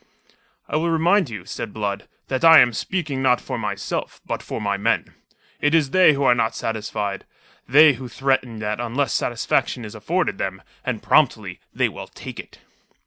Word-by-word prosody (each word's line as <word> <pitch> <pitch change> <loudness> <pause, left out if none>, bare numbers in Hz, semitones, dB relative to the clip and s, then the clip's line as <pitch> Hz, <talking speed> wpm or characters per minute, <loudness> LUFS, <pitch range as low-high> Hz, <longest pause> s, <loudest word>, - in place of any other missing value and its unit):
"I - - -1
will 170 +2 0
remind 170 +1 +2
you," 100 -6 -8
said 105 +2 -6
Blood, 100 -2 -3 0.2
"that 130 -1 -2
I 165 -1 +9
am 125 -4 +6
speaking 150 - -3
not 125 -2 +3
for 130 -3 -5
myself, 105 -2 -4
but - - -4
for - - -6
my 100 -1 -1
men. 100 - -1 0.5
It 145 +2 +2
is 150 -5 +2
they 185 -3 +6
who 140 0 -1
are 125 - +5
not 115 -2 0
satisfied, 105 -2 -3 0.4
they 150 +3 +7
who 130 0 -8
threaten 130 -2 -1
that 105 +1 -3
unless 120 +2 -1
satisfaction 120 0 -1
is 105 - -9
afforded 160 - -2
them, 95 -2 -4 0.2
and - - -3
promptly, - - +2
they - - +1
will - - -8
take - - -10
it." - - -10
125 Hz, 180 wpm, -22 LUFS, 105-145 Hz, 0.5 s, I